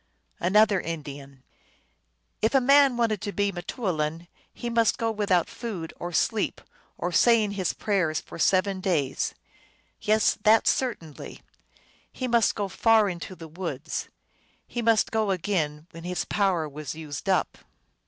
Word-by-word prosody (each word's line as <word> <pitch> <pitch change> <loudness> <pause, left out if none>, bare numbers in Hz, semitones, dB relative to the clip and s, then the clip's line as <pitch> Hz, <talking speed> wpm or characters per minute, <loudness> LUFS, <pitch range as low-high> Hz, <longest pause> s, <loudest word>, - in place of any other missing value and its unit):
Another 200 +1 +4
Indian. 140 -4 -7 1.0
"If 220 +5 +2
a - - +7
man 275 0 +5
wanted 225 -4 +1
to 205 -1 -3
be 200 0 0
m 195 - -7
te - - -7
oulin 165 -6 -2 0.2
he 240 - -6
must 230 -2 +2
go 230 -1 0
without 200 -5 +1
food, 195 -9 -6
or 175 - -4
sleep, 215 +5 0 0.4
or 175 - -2
saying 220 +3 +4
his 190 -3 -1
prayers, 180 -7 0
for - - -11
seven 190 +2 +2
days. 165 -9 0 0.7
Yes, 215 0 +2
that 215 +1 +5
certainly. 170 - -2 0.7
He 255 - -4
must 235 -3 +3
go 205 -2 -2
far 220 +2 +3
into 180 +1 -6
the 165 -2 -10
w^oods. 160 -3 -5 0.6
He 240 - -4
must 225 -1 +3
go 220 -2 +1
again 165 -5 -1
when 165 0 -10
his 180 -1 -2
power 190 -6 +1
was 150 -1 -7
used 155 -3 -6
up." - - +1
190 Hz, 150 wpm, -26 LUFS, 165-220 Hz, 1.0 s, a